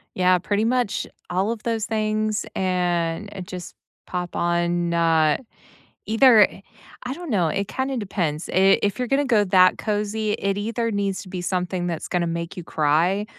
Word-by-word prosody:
Yeah, 185 0 +4
pretty 205 +4 -1
much 245 -2 0 0.2
all 190 +5 0
of 230 - -5
those 225 -2 -1
things, 215 0 -1
and 180 0 -1
it 185 -2 -7
just 180 -2 -8 0.3
pop 180 -1 -4
on, 175 0 0
uh, 160 -2 +3 0.7
either 225 -2 +6 0.6
I 255 +1 -3
don't 345 -2 -8
know, 180 -6 +2
it 200 +3 -1
kinda 265 0 -2
depends. 175 -7 -2
I 195 +1 +5
if 205 +2 0
you're 250 -2 -2
gonna 280 +1 +2
go 225 -6 +3
that 185 -1 +4
cozy, 210 0 -1
it 200 -1 -1
either 230 +2 -2
needs 200 -2 -2
to 190 - -12
be 185 - -4
something 180 0 -2
that's 170 -3 -4
gonna 175 -2 0
make 170 +1 -4
you - - -5
cry 165 +7 +1
195 Hz, 170 wpm, -23 LUFS, 175-215 Hz, 0.7 s, either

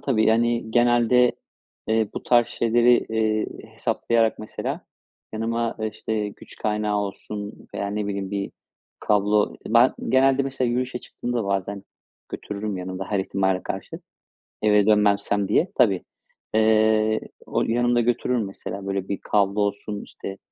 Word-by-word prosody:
tabii, 110 -6 +2
yani, 115 0 +2
genelde, 120 +1 +4 0.6
eee, 110 -1 +2
bu - - -4
tarz 120 -1 +4
şeyleri, 120 +1 +3
eee, 110 -1 +1 0.3
hesaplayarak 115 -1 +1
mesela 110 - -4 0.5
yanıma, 115 +1 -1
eee, 110 0 -1
işte, 105 -2 -2
güç - - -14
kaynağı 105 -1 -1
olsun 105 +1 -5 0.2
veya, 100 - -2
ne 105 0 -2
bileyim, 100 -1 -3
bir 100 -1 -3 0.5
kablo 105 0 +2
Ben, 120 +3 +5
genelde 135 +1 +4
mesela 130 -2 -1
yürüyüşe 125 +1 -1
çıktığımda 120 -2 -4
bazen 100 0 -2 0.5
götürürüm 105 0 -5
yanımda 95 +1 -5
her 100 - +1
ihtimale 95 -1 0
karşı, - - -6 0.6
eve 105 -1 +4
dönmezsem 100 -1 +3
diye. 180 +3 +2
Tabii. 100 -8 +3 0.5
Eee, 110 0 +3 0.3
o - - -1
yanımda 120 +1 +2
götürürüm 120 -1 0
mesela, 100 0 -7
böyle, 95 -1 -2
bir 100 - -2
kablo 100 0 +1
olsun, 100 0 -2
işte, 95 0 -8
110 Hz, 135 wpm, -24 LUFS, 100-120 Hz, 0.6 s, Ben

